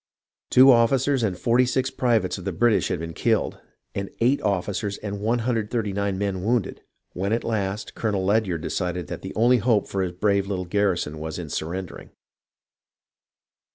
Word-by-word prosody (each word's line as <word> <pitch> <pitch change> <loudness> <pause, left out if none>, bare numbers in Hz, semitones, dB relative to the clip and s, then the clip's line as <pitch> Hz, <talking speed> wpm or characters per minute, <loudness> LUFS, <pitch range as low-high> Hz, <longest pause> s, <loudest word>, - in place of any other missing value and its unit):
Two 130 +2 +8
officers 130 +3 +3
and 100 -5 -1
46 125 +5 +2
privates 115 -7 +1
of - - -9
the 95 - -1
British 115 +5 +2
had 95 - -1
been 85 0 -6
killed, - - 0 0.3
and 100 -1 -4
8 130 +5 +2
officers 100 +1 -1
and 100 -1 -5
139 110 -3 -1
men 95 -2 -2
wounded, 115 0 0 0.3
when 95 +3 -2
at 115 - 0
last 105 -2 -2
Colonel 100 -4 -1
Ledyard 100 -5 +1
decided 90 -1 -2
that - - -5
the - - -7
only 120 +3 +4
hope 110 -3 +2
for 95 - -2
his 90 -2 -2
brave 100 +1 +1
little 95 -2 -3
garrison 90 -5 0
was 80 0 -5
in 85 -4 -6
surrendering. 85 +5 -5
100 Hz, 155 wpm, -24 LUFS, 95-115 Hz, 0.3 s, Two